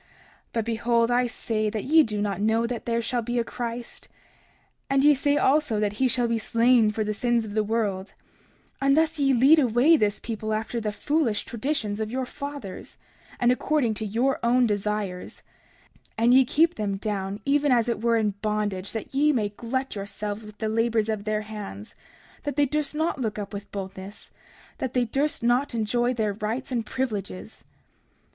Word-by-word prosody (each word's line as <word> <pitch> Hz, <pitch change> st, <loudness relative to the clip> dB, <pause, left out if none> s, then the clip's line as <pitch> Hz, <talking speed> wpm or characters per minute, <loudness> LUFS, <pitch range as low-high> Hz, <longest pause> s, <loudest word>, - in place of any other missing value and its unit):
But 230 Hz, -2 st, -1 dB
behold, 230 Hz, +1 st, +1 dB
I 245 Hz, 0 st, +3 dB
say 215 Hz, -2 st, -2 dB
that 215 Hz, -1 st, -3 dB
ye 320 Hz, +4 st, +6 dB
do 210 Hz, -7 st, -1 dB
not 200 Hz, -2 st, -2 dB
know 220 Hz, +2 st, +2 dB
that 235 Hz, -1 st, -5 dB
there 235 Hz, 0 st, 0 dB
shall 240 Hz, +1 st, -1 dB
be 240 Hz, +2 st, -3 dB
a 235 Hz, -, +2 dB
Christ. 235 Hz, 0 st, -6 dB, 0.8 s
And 275 Hz, 0 st, +3 dB
ye 295 Hz, 0 st, +7 dB
say 285 Hz, +1 st, +1 dB
also 275 Hz, -6 st, +2 dB
that 210 Hz, -1 st, 0 dB
he 260 Hz, -, +5 dB
shall 245 Hz, -1 st, +2 dB
be 230 Hz, -1 st, 0 dB
slain 230 Hz, 0 st, +3 dB
for 215 Hz, +1 st, -1 dB
the 215 Hz, 0 st, -2 dB
sins 235 Hz, +1 st, 0 dB
of 205 Hz, -, -7 dB
the 215 Hz, 0 st, +1 dB
world— 205 Hz, -3 st, -2 dB, 0.7 s
30:27 275 Hz, -, +1 dB
And 275 Hz, +2 st, +4 dB
thus 320 Hz, 0 st, +2 dB
ye 275 Hz, -1 st, +3 dB
lead 270 Hz, +6 st, +6 dB
away 255 Hz, +5 st, +4 dB
this 210 Hz, -5 st, 0 dB
people 220 Hz, -1 st, -3 dB
after 225 Hz, +2 st, -3 dB
the 210 Hz, -1 st, -2 dB
foolish 250 Hz, -1 st, 0 dB
traditions 225 Hz, -4 st, -2 dB
of 215 Hz, -1 st, -2 dB
your 260 Hz, +1 st, -2 dB
fathers, 280 Hz, -8 st, -8 dB, 0.4 s
and 245 Hz, 0 st, +4 dB
according 255 Hz, -2 st, +1 dB
to 220 Hz, -, -5 dB
your 245 Hz, +6 st, 0 dB
own 245 Hz, +1 st, +3 dB
desires; 205 Hz, -3 st, -3 dB, 0.7 s
and 230 Hz, +2 st, +4 dB
ye 260 Hz, 0 st, +6 dB
keep 325 Hz, +7 st, +3 dB
them 200 Hz, -2 st, -2 dB
down, 200 Hz, -1 st, -3 dB
even 285 Hz, 0 st, +2 dB
as 240 Hz, -2 st, +3 dB
it 235 Hz, -2 st, -1 dB
were 230 Hz, 0 st, +3 dB
in 215 Hz, -2 st, +1 dB
bondage, 210 Hz, -3 st, -2 dB
that 225 Hz, +3 st, -6 dB
ye 295 Hz, +3 st, +4 dB
may 220 Hz, -7 st, 0 dB
glut 255 Hz, +5 st, -3 dB
yourselves 205 Hz, +1 st, -5 dB
with 210 Hz, 0 st, -12 dB
the 220 Hz, -, -2 dB
labors 225 Hz, 0 st, +1 dB
of 215 Hz, -2 st, -2 dB
their 215 Hz, 0 st, 0 dB
hands, 205 Hz, -, -8 dB, 0.5 s
that 290 Hz, -3 st, -4 dB
they 290 Hz, 0 st, +3 dB
durst 300 Hz, +1 st, -1 dB
not 315 Hz, -3 st, -1 dB
look 215 Hz, -3 st, -2 dB
up 205 Hz, 0 st, -6 dB
with 200 Hz, 0 st, -7 dB
boldness, 195 Hz, 0 st, -8 dB
and -, -, -27 dB
that 260 Hz, -1 st, -3 dB
they 250 Hz, -1 st, +3 dB
durst 275 Hz, +3 st, -1 dB
not 245 Hz, +2 st, +1 dB
enjoy 240 Hz, +2 st, +1 dB
their 220 Hz, -4 st, -1 dB
rights 225 Hz, +6 st, -4 dB
and 235 Hz, -3 st, -2 dB
privileges. 215 Hz, -5 st, -4 dB
230 Hz, 195 wpm, -25 LUFS, 210-255 Hz, 0.8 s, ye